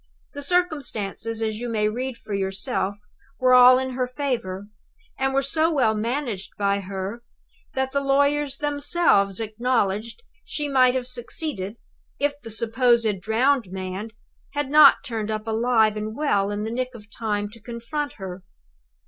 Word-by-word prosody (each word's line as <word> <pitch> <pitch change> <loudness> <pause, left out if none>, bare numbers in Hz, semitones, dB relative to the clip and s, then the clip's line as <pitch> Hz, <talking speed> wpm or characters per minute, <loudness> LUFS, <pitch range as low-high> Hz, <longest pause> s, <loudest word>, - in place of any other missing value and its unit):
The 285 - -6
circumstances, 260 - -1
as 220 -1 -2
you 240 0 -4
may 215 -2 +1
read 250 +3 -3
for 210 - -8
yourself, 195 +1 -2 0.4
were 255 -1 +4
all 250 0 +9
in 260 0 -2
her 255 0 -1
favor, 245 -8 -3 0.5
and 270 0 +1
were 275 +1 +1
so 315 +4 +2
well 255 -8 +3
managed 230 -2 -3
by 200 0 +1
her 195 +3 -5 0.5
that 265 0 0
the 280 - 0
lawyers 280 0 +2
themselves 285 - +2
acknowledged 225 - -1 0.2
she 295 -1 -3
might 255 -2 +4
have 255 -1 -1
succeeded, 245 - -3 0.4
if 285 0 +1
the 230 - -9
supposed 230 -2 +2
drowned 230 +1 +1
man 190 +3 -5 0.4
had 290 -1 -2
not 300 -2 +7
turned 225 -5 -3
up 215 0 -3
alive 225 -1 +2
and 215 +1 -4
well 205 -10 +1
in 205 0 -3
the 220 - -3
nick 255 +1 -3
of 210 -3 -11
time 210 -2 -1
to 230 - -14
confront 240 +6 -4
her. 190 -2 -8
235 Hz, 155 wpm, -24 LUFS, 210-270 Hz, 0.5 s, all